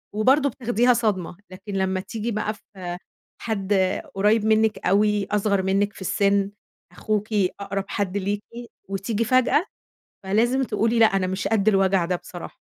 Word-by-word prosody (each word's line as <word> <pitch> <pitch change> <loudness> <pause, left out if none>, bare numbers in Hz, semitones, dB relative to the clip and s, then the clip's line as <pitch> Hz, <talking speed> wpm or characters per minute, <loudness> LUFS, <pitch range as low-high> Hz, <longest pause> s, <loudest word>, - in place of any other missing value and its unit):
وبرضو 270 +6 +3
بتاخديها 245 0 +2
صدمة، 195 -7 -1
لكن 195 +2 -9
لمّا 190 -1 0
تيجي 220 +4 -4
بقى 215 0 -2
في 185 -4 -8 0.4
حد 205 -3 -2 0.4
قريب 210 +2 +2
منِك 220 0 +3
أوي 205 +1 +2
أصغر 200 -1 +1
منِك 200 +2 +1
في - - -14
السن، 200 +1 +1 0.4
أخوكِ 210 -1 -2 0.3
أقرب 195 0 -3
حد 200 -2 -2
ليكِ، 200 +1 -2 0.5
وتيجي 200 +3 -1
فجأة، 255 - +3 0.6
فلازم 235 +7 +1
تقولي 230 0 0
لأ، 225 - +7
أنا 195 -2 0
مش 190 +1 -2
قدّ 215 -1 +2
الوجع 195 -2 +3
ده 180 +1 -1
بصراحة. 175 0 -10
205 Hz, 145 wpm, -23 LUFS, 195-220 Hz, 0.6 s, لأ